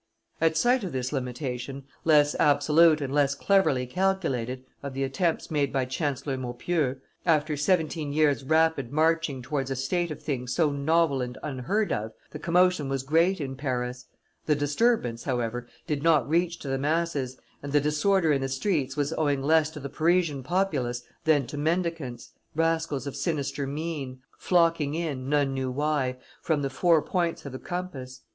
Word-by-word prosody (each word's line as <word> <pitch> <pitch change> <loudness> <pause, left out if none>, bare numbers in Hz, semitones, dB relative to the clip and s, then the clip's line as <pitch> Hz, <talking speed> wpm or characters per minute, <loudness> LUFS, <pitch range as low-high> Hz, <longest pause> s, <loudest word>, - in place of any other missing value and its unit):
At 160 -1 +3
sight 245 +4 +3
of 185 - -4
this 130 +1 -2
limitation, 130 0 -4 0.2
less 150 -2 +5
absolute 150 +2 +5
and 135 -1 -3
less 140 -1 +2
cleverly 145 -8 +2
calculated, 130 -6 -1 0.2
of 140 -2 -6
the 135 - -1
attempts 160 +6 -1
made 145 -3 +1
by 130 -1 0
Chancellor 135 0 -2
Maupeou, 130 +2 -1 0.2
after 155 -2 +2
seventeen 155 -1 0
years' 145 -2 +2
rapid 160 -3 +2
marching 155 -3 +1
towards 135 0 -2
a 135 - -1
state 170 +7 -1
of 155 - -6
things 125 -4 -3
so 160 -4 +3
novel 140 0 +2
and 125 0 -4
unheard 150 - -1
of, 110 +1 -2 0.2
the 150 - -7
commotion 175 -3 +2
was 135 -1 -1
great 165 +6 +2
in 135 -3 -4
Paris; 125 -2 -3 0.4
the 150 - +4
disturbance, 145 - +1
however, 120 -2 -2 0.2
did 150 -4 -2
not 155 -4 +3
reach 170 +2 +1
to - - -7
the 135 0 -1
masses, 145 -4 -1 0.2
and 140 - -6
the 145 - +4
disorder 155 +3 +2
in 135 - 0
the 135 - -2
streets 135 -1 -1
was 145 +2 0
owing 145 -3 +1
less 155 +1 +4
to 155 - -9
the 140 - -5
Parisian 160 0 +1
populace 130 -7 -1 0.2
than 150 -4 +4
to 145 +4 -6
mendicants, 160 -6 -2 0.2
rascals 165 -4 0
of 140 - -5
sinister 140 -1 -2
mien, 145 -3 -4 0.2
flocking 165 -4 +2
in, 145 -6 -3
none 145 -2 +2
knew 130 -1 -2
why, 135 -1 0 0.2
from 150 -3 0
the 135 - -2
four 160 +4 +3
points 170 -4 -1
of 140 - -6
the 130 - -7
compass. 145 -8 -6
145 Hz, 170 wpm, -27 LUFS, 135-165 Hz, 0.4 s, less